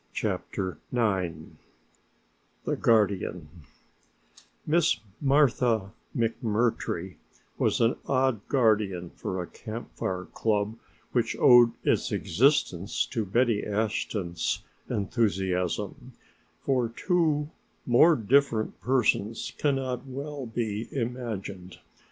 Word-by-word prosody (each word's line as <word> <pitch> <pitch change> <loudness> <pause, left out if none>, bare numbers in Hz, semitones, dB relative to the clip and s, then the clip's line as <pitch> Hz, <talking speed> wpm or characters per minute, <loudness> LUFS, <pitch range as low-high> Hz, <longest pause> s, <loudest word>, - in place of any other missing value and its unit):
CHAPTER 95 -2 -3
IX 95 -8 +1 1.3
THE - - 0
GUARDIAN 100 -7 +1 1.2
Miss 165 +2 +3 0.2
Martha 125 -7 +3 0.3
McMurtry 110 -5 -1 0.4
was - - +2
an 115 0 +3
odd 130 -5 +2
guardian 105 -9 +1
for 95 - -4
a 90 - -3
Camp 110 +6 -8
Fire 90 -1 -3
club 105 -1 0 0.4
which - - 0
owed 120 -1 +7
its - - +1
existence 100 - +1
to 115 -3 -1
Betty 115 +2 +1
Ashton's 105 -4 -2 0.3
enthusiasm, 95 -5 -1 0.5
for 125 -4 +1
two 155 +2 0 0.3
more 155 +7 +6
different 115 -1 +1
persons 115 -3 +1
cannot 135 -3 -1
well 140 0 -5
be 115 -1 -3
imagined. 110 -8 -4
115 Hz, 90 wpm, -27 LUFS, 100-130 Hz, 1.3 s, owed